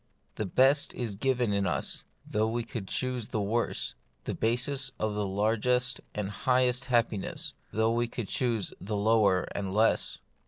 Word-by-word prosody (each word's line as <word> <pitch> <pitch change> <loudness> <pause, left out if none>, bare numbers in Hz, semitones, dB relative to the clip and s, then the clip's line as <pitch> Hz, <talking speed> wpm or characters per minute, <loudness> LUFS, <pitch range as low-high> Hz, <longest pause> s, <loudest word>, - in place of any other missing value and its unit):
The 105 - -3
best 135 +8 +3
is 120 -4 -3
given 120 0 +1
us, 85 - -2 0.2
though 110 +1 +1
we 115 +1 -1
would 105 -5 -4
choose 125 -2 -2
the 110 - -2
worse: 105 - 0 0.3
the - - -3
basis 125 +4 0
of 110 -1 -1
the 105 -1 -1
largest 115 +5 +1
and 105 -1 -2
highest 125 +3 +2
happiness, 115 -5 0 0.2
though 110 +1 +2
we 120 0 +1
would - - -2
choose 125 - 0
the 105 +2 -2
lower 100 -3 +4
and 100 -1 -2
the - - -4
less. 110 +2 +2
115 Hz, 160 wpm, -29 LUFS, 105-125 Hz, 0.3 s, lower